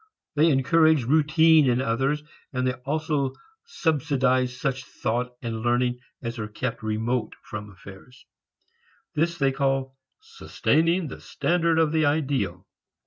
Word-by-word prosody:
They 155 +3 +4
encourage 155 +1 +4
routine 155 +2 +4
in 120 0 +2
others, 135 +5 0 0.3
and 125 -2 -1
they 130 - +1
also 140 +1 -2 0.3
subsidize 135 - 0
such 130 -1 -2
thought 125 0 -3
and 115 -1 -3
learning 120 +1 +1 0.2
as 115 0 -4
are 105 - -3
kept 115 +3 -4
remote 110 +2 -2
from 105 -1 -7
affairs. 100 +6 -14 0.9
This 170 +3 0
they 135 -3 +2
call 135 -1 -1 0.2
sustaining 180 - 0
the - - -9
standard 170 -1 0
of 160 -2 +3
the 155 -2 +2
ideal. 145 -2 -1
135 Hz, 130 wpm, -25 LUFS, 125-155 Hz, 0.9 s, They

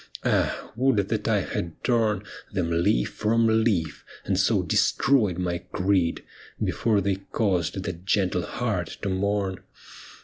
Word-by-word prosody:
Ah, - - 0
would 115 -6 +2
that - - -1
I - - +3
had 85 -2 -5
torn 110 -5 +1 0.3
Them 90 -4 -1
leaf 85 -8 +2
from 110 +1 +2
leaf, 90 -9 0 0.2
and - - 0
so - - +2
destroyed 110 -11 +2
my 90 -1 -1
creed, 90 -1 0 0.4
Before 110 -3 +1
they 100 0 0
caused 95 -3 0
that 90 -1 -5
gentle 95 -2 +1
heart 105 -4 -3
to 100 - 0
mourn 95 0 -1
95 Hz, 135 wpm, -25 LUFS, 90-110 Hz, 0.4 s, I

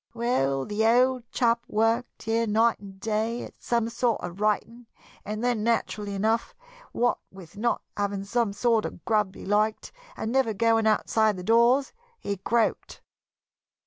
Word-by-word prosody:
Well, 135 - 0
the 210 +1 -1
old 245 +1 +3
chap 235 -1 +1
worked 225 +3 0
here 225 +1 0
night 225 +2 +2
and 195 -1 -12
day 225 +2 -1
at - - -12
some 235 -1 0
sort 235 0 0
of 175 +3 -6
writing, 225 +3 -1 0.4
and 215 +2 -5
then, 240 -3 0
naturally 210 -3 -1
enough, 220 +4 0 0.4
what 245 +1 +1
with 185 -1 -14
not 235 +4 -1
having 200 -1 -2
the 220 +1 -1
sort 230 -1 +2
of - - -8
grub 210 -4 +1
he - - -10
liked, 210 +2 0 0.3
and 220 - -3
never 260 -4 +2
going 225 +1 +2
outside 215 -1 +2
the 180 - -6
doors, 235 +6 +3 0.2
he 200 - -3
croaked." 225 +4 -1
225 Hz, 155 wpm, -26 LUFS, 205-235 Hz, 0.4 s, old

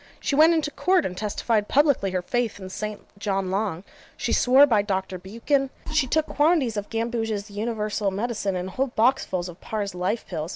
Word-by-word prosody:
She - - -2
went 320 +3 +6
into 310 -2 0
Court, 365 +3 +2
and 180 - -3
testified 210 +1 -1
publicly 280 -8 +3
her 185 -1 -2
faith 240 0 -1
in 190 -1 -8
St. 210 +1 -5 0.2
John 195 -2 -1
Long: 195 -3 -1 0.3
she - - -1
swore 260 +3 +6
by 225 -7 +3
Doctor 190 -2 -3
Buchan, 235 +9 -1 0.2
she 300 -4 +2
took 315 +4 +1
quantities 295 -7 +2
of 205 -1 -4
Gambouge's 225 -2 -2
Universal 210 -1 -2
Medicine, 205 -1 -2
and 180 +1 -4
whole 265 +7 0
boxfuls 220 -7 +2
of 175 0 -11
Parr's 205 -3 -3
Life 180 +6 -2
Pills. 160 -2 -4
215 Hz, 180 wpm, -25 LUFS, 195-255 Hz, 0.3 s, went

